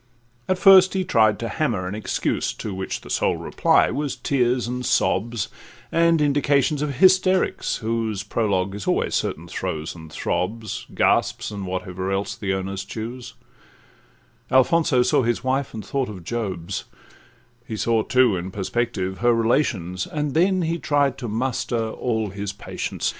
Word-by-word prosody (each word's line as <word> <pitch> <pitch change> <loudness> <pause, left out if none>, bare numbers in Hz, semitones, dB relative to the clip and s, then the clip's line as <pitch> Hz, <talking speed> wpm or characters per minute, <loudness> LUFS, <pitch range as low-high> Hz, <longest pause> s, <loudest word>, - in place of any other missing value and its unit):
At 185 - +2
first 190 0 +7
he 190 - +1
tried 110 - +3
to 115 - -4
hammer 105 -6 -1
an 95 - -4
excuse, 105 0 -1
To 105 - -6
which 95 0 -4
the - - -12
sole - - +1
reply - - +2
was 145 -3 -2
tears 125 -1 0
and 125 +1 -3
sobs, 115 -2 +1 0.4
And 165 0 +3
indications 145 0 +2
of 145 -2 -2
hysterics, 185 +3 +3
whose 110 -3 -2
Prologue 100 -3 0
is 100 -1 -6
always - - +1
certain - - -2
throes, 80 0 -4
and 80 -2 -12
throbs, 110 +7 -3
Gasps, - - +1
and 100 -2 -5
whatever 95 +1 -3
else 100 +1 -2
the 100 -2 -3
owners 95 0 -3
choose: 120 +2 -7 1.1
Alfonso 130 0 +4
saw - - +3
his 120 0 -1
wife, 130 +1 0
and 110 -3 -7
thought 135 +2 -1
of 95 -5 -8
Job's; 95 -4 -4 0.8
He 110 - -4
saw 110 +2 +2
too, 125 -3 +3
in 90 +1 -4
perspective, 95 -1 -2
her 120 0 +3
relations, 110 - 0
And 150 -2 -2
then 185 +2 +3
he 165 +1 -1
tried 140 -3 +1
to 120 - -4
muster 115 0 -1
all 110 -5 -2
his 100 +1 -4
patience. - - -4
115 Hz, 155 wpm, -23 LUFS, 100-140 Hz, 1.1 s, first